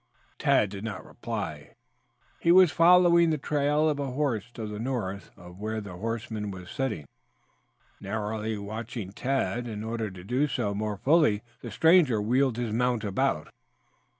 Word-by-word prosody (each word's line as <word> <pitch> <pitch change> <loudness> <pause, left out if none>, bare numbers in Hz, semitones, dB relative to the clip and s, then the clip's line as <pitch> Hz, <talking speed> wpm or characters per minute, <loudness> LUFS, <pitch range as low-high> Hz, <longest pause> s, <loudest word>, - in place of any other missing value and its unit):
Tad 105 - +3
did 100 0 -7
not 105 -4 -5
reply. - - -6 0.6
He 170 - +3
was 185 -2 +7
following 170 0 +6
the 155 - +1
trail 150 +2 +1
of 150 -2 0
a 140 - -2
horse 125 -5 -1
to 110 - -5
the 105 0 -6
north 110 -6 -3
of 90 +1 -13
where 110 +1 -3
the 100 -3 -8
horseman 110 +1 -4
was 90 -2 -9
sitting, 135 - -2 0.9
narrowly 110 +1 -3
watching 105 0 -6
Tad. 125 +1 -1
In 105 -2 -5
order 115 -1 -3
to 95 -2 -11
do 125 +9 +1
so 120 -6 -1
more 105 0 -3
fully, 135 - +3 0.2
the - - -6
stranger 160 -9 +4
wheeled 125 +3 +1
his 120 -3 -2
mount 120 -1 +1
about. 100 -2 -1
115 Hz, 155 wpm, -27 LUFS, 105-140 Hz, 0.9 s, was